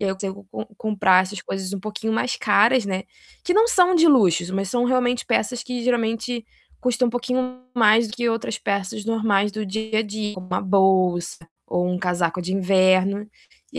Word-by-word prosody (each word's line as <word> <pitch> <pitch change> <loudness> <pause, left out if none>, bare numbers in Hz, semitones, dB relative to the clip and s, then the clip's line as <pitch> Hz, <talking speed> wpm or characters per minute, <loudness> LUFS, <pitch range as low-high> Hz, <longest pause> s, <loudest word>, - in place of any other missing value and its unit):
E 205 - -2
aí 190 - +1
eu 190 - -4
tento 195 0 -7
com - - -6
comprar 190 -4 +3
essas 190 +1 -7
coisas 195 0 -5
um - - -4
pouquinho 215 +2 -4
mais 250 +3 -1
caras, 215 +2 +3
né, 190 -1 -2 0.4
que 360 - +1
não 445 +2 +4
são 365 -5 +4
de 335 0 +5
luxos, 180 - +3
mas 195 0 -2
são 245 -1 +1
realmente 245 -1 0
peças 245 +2 0
que 250 -1 -5
geralmente 235 -1 -1 0.4
custam 250 0 +1
um - - -2
pouquinho 255 +1 -3 0.2
mais 220 0 +4
do 215 - -7
que 240 -1 0
outras 225 -1 -2
peças 200 +1 -3
normais 210 -3 +1
do 215 0 -4
dia 220 +2 -2
a 220 - +2
dia, 210 0 -5
como 185 -1 -9
uma 185 - -2
bolsa 185 -3 +2 0.3
ou 180 0 -1
um 180 0 -1
casaco 180 -1 -1
de 185 +2 -3
inverno, 190 +2 +2 0.4
e - - -6
210 Hz, 200 wpm, -22 LUFS, 190-240 Hz, 0.4 s, de